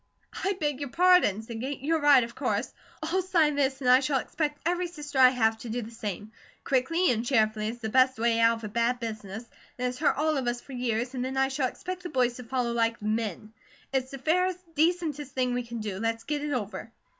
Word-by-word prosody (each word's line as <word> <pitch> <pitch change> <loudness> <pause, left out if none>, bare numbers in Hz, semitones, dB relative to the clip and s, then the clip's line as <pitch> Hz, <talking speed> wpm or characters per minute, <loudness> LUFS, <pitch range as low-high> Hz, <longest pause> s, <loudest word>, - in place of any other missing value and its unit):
"I 390 +1 +1
beg 295 -3 -1
your 285 -2 -4
pardon," 355 - +4
said 225 0 -7
Kate. 270 +2 -4
"You're 320 +3 0
right, 285 -4 +6
of 235 0 -7
course. 235 -4 -2 0.3
I'll 345 +4 0
sign 335 -5 +2
this, 275 -1 0
and 255 - -2
I 255 - +8
shall 275 0 0
expect 295 +2 -2
every 355 +1 0
sister 295 -5 -5
I 255 -1 +9
have 225 -3 +1
to 235 - -8
do 240 +2 -2
the 220 - -9
same, 210 -2 -6 0.3
quickly 305 +7 +2
and 230 -1 0
cheerfully, 220 -4 +1
as 235 - -6
the 220 - -3
best 260 +2 +4
way 230 0 +2
out 230 0 +4
of 225 - -13
a - - -3
bad 235 +3 0
business 220 -1 -6 0.3
that 250 - -4
has 250 0 -2
hurt 300 - +2
all 310 +1 +1
of 260 -2 -2
us 240 0 -1
for 270 - -12
years, 245 0 -1
and 250 -1 -2
then 260 +1 -3
I 265 0 +3
shall 270 -1 0
expect 365 +7 -6
the 355 - -6
boys 250 -4 +1
to 250 - -8
follow 245 0 -1
like 230 -1 +1
men. 215 -1 -3 0.4
It's 260 -1 0
the 275 - -7
fairest, 360 +4 0
decentest 310 -3 0
thing 250 -1 0
we 245 - 0
can 235 -1 -7
do, 205 -3 -4
let's 225 +1 -1
get 295 -1 -2
it 295 - -2
over." 220 -3 -4
255 Hz, 235 wpm, -28 LUFS, 230-295 Hz, 0.4 s, I